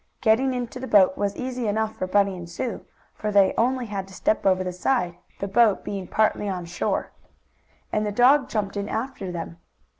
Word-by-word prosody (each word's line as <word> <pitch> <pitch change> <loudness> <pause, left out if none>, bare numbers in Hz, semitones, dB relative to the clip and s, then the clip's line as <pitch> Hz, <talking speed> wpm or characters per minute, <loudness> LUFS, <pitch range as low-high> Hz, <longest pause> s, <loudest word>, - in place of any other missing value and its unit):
Getting 250 +4 +3
into 245 0 -4
the 260 - -5
boat 190 -4 +5
was 200 -1 -1
easy 255 -2 -3
enough 220 +1 -1
for 185 - -3
Bunny 200 0 +2
and 175 -1 -8
Sue, 230 +8 -4 0.3
for 210 - -3
they 200 -2 +5
only 250 +2 +1
had 200 -3 -4
to 190 - -13
step 215 - +1
over 185 -1 +3
the 180 -1 -4
side, 180 -2 0 0.2
the 200 - -3
boat 215 0 +3
being 195 -3 -5
partly 215 0 +1
on 180 -2 -4
shore. 175 +1 -2 0.8
And 215 - +1
the 210 - -1
dog 255 +5 +4
jumped 205 -3 -2
in 200 0 -3
after 225 -5 -4
them. 170 -1 -6
205 Hz, 200 wpm, -24 LUFS, 190-235 Hz, 0.8 s, boat